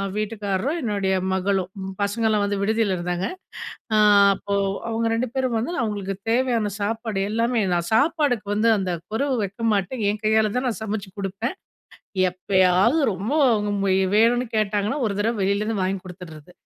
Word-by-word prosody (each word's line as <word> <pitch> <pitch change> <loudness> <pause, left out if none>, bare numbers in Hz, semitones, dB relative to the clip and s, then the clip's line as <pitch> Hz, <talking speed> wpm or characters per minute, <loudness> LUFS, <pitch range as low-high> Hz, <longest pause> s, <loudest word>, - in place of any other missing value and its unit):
வீட்டுக்காரரும், 210 - -2
என்னுடைய 200 -5 0 0.2
மகளும் 190 -1 0 0.3
பசங்கலாம் 210 +1 +1
வந்து 200 0 -1
விடுதில 220 -1 +1
இருந்தாங்க. 175 +1 -2 0.7
ஆ - - +4 0.4
அப்போ 200 +1 -4 0.3
அவுங்க 230 0 -1
2 245 +3 -1
பேரும் 260 -2 0
வந்து, 240 +10 -2
அவுங்களுக்கு 200 -3 -3 0.2
தேவையான 235 -4 +1
சாப்பாடு 220 0 -2
எல்லாமே 230 +2 +1
நான் 170 0 -1
சாப்பாடுக்கு 280 -4 +2
வந்து 215 +2 +2
அந்த 190 -2 -2 0.2
குறவு 265 +3 0
வைக்க 200 +4 -4
மாட்டேன். 205 +4 -1
என் 210 0 -4
கையால 215 0 +3
தான் 255 +1 0
நான் 230 - -3
சமைச்சு 210 -2 -4
குடுப்பேன். 200 - -3 0.7
எப்பயாவது 185 - +2
ரொம்ப 195 +6 -4 0.2
அவுங்க 210 -2 0 0.5
வேணுன்னு 240 +3 +3
கேட்டாங்கன்னா, 210 +4 0
ஒரு 200 - -3
தரவை 225 +2 0
வெளியிலேருந்து 200 +2 0
வாங்கிக் 190 0 -2
குடுத்துர்றது. 180 -3 -11
210 Hz, 145 wpm, -23 LUFS, 195-230 Hz, 0.7 s, ஆ